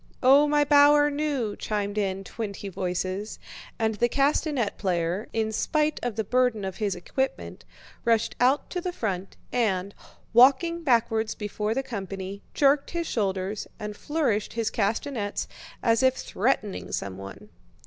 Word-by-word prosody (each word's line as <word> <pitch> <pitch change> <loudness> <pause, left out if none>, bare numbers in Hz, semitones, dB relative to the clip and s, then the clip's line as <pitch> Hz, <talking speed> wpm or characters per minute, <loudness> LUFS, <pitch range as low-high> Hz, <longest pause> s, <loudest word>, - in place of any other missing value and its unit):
"Oh, 275 +3 +7
my 295 0 +3
bower 290 0 +6
new...!" 285 -7 -1
chimed 205 -1 -2
in 195 -2 -1
twenty 200 -2 -5
voices, 185 +3 -3 0.4
and 220 -1 +1
the 240 +3 +1
castanet 275 -4 +1
player, 180 +1 -1
in 220 -1 -1
spite 305 +7 0
of 245 -3 -2
the 220 - -1
burden 245 -2 +1
of 190 -1 -5
his 205 -3 -1
equipment, 265 +9 -3 0.4
rushed 230 -1 +2
out 260 +4 +2
to 360 - -2
the 360 - -2
front 195 - -4 0.2
and, 200 -5 0 0.4
walking 275 +8 +5
backwards 225 -5 +1
before 210 +1 -2
the 270 - 0
company, 195 -3 -6
jerked 280 0 +3
his 340 -1 -2
shoulders 195 -4 -2
and 210 0 -6
flourished 275 -7 -1
his 230 -1 -1
castanets 215 +1 -1 0.4
as 230 0 +3
if 260 0 +4
threatening 215 -4 -1
someone. 100 0 -6
220 Hz, 140 wpm, -26 LUFS, 200-275 Hz, 0.4 s, Oh